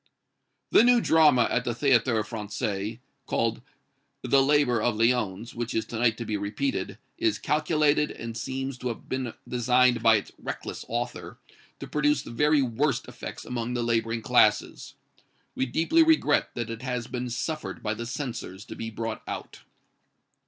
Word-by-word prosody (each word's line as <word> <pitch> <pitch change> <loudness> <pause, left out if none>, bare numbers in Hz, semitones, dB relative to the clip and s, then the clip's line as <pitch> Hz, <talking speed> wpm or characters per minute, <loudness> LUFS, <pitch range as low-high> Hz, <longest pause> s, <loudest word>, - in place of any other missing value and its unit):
"THE - - +7
NEW 245 0 +6
DRAMA 155 - +5
at - - +1
the 120 - -2
Théâtre 120 -4 +3
Français, 105 -1 -4 0.3
called - - 0 0.6
'The 140 - +4
Laborer 135 -4 +3
of 120 -1 +1
Lyons,' 115 -2 0
which 120 0 -4
is 110 - 0
to 115 - -6
night 115 -1 +2
to 115 - -5
be 105 -1 -2
repeated, 105 - -2 0.2
is 335 -1 +1
calculated 150 -1 +2
and 115 -1 -7
seems 130 +2 -4
to 125 - -4
have 115 - -5
been 130 -3 -3
designed 125 0 +3
by 115 -1 +6
its 100 - -2
reckless - - -6
author 120 +1 -4 0.4
to - - -6
produce 150 0 +1
the - - -9
very 150 +4 +3
worst 130 +2 0
effects - - -8
among 125 0 -3
the 120 - -1
laboring 115 -1 0
classes. - - +2 0.6
We 130 - -1
deeply 165 - +3
regret 320 -1 +3
that 120 -1 -3
it 115 0 -6
has 125 -2 -3
been 125 0 -4
suffered 155 +6 -4
by 110 - 0
the 115 +1 -6
censors 120 -7 -5
to - - -9
be 115 - -5
brought 115 0 -4
out." - - -6
120 Hz, 165 wpm, -27 LUFS, 115-140 Hz, 0.6 s, THE